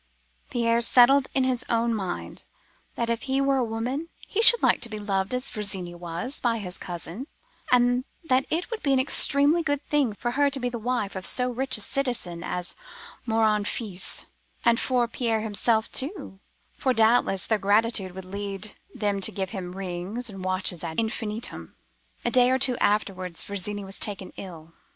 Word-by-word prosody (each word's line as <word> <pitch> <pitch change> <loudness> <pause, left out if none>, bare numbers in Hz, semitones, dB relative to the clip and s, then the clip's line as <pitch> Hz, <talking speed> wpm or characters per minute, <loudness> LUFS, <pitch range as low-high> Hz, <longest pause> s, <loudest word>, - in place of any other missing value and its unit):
Pierre 235 -1 +1
settled 260 +3 +5
in 265 - +3
his 255 -1 0
own 230 0 +1
mind, 175 - -4 0.5
that 235 - -1
if 235 0 -1
he 265 +1 +2
were 275 0 +2
a 255 - +2
woman, 245 +8 -3 0.2
he 425 - -1
should 475 +1 +8
like - - +3
to 235 - 0
be 215 - -5
beloved 195 -2 -1
as 250 +1 -1
Virginie 195 -5 -1
was, 175 - -4
by 235 -2 +1
his 185 -4 -4
cousin, 175 - -5 0.4
and 245 0 +4 0.2
that 265 -4 +1
it 345 +8 -2
would 460 - -4
be 280 -2 +2
an 265 - +3
extremely 285 +4 +3
good 290 -2 -1
thing 285 -7 +1
for 240 +3 -3
her 285 +3 +2
to 275 -1 +1
be 250 -1 -1
the 240 -1 -5
wife 230 -4 -2
of 190 0 -2
so 250 0 +3
rich 255 +1 +1
a - - -3
citizen 225 -10 -2
as 180 0 -3 0.5
Morin 220 -2 +2
Fils,—and 215 +3 -2
for 250 -2 +1
Pierre 230 -2 -1
himself, 220 +1 0
too, 275 - -2 0.4
for 260 - +1
doubtless 220 -4 +3
their 220 -2 +1
gratitude 205 -1 +2
would 190 -1 -8
lead 200 +1 -5 0.2
them 205 -2 -1
to - - +4
give 190 -2 -4
him 180 -4 -6
rings 195 +5 -4
and 195 -2 -8
watches 185 -2 0
ad 160 - -3
infinitum. 220 0 -4 0.5
"A 240 - +1
day 250 0 +5
or 260 - +3
two 260 -1 +2
afterwards, 185 -4 0
Virginie 200 0 -2
was 195 +1 -4
taken 200 -3 -3
ill. 165 -4 -10
225 Hz, 180 wpm, -26 LUFS, 195-255 Hz, 0.5 s, should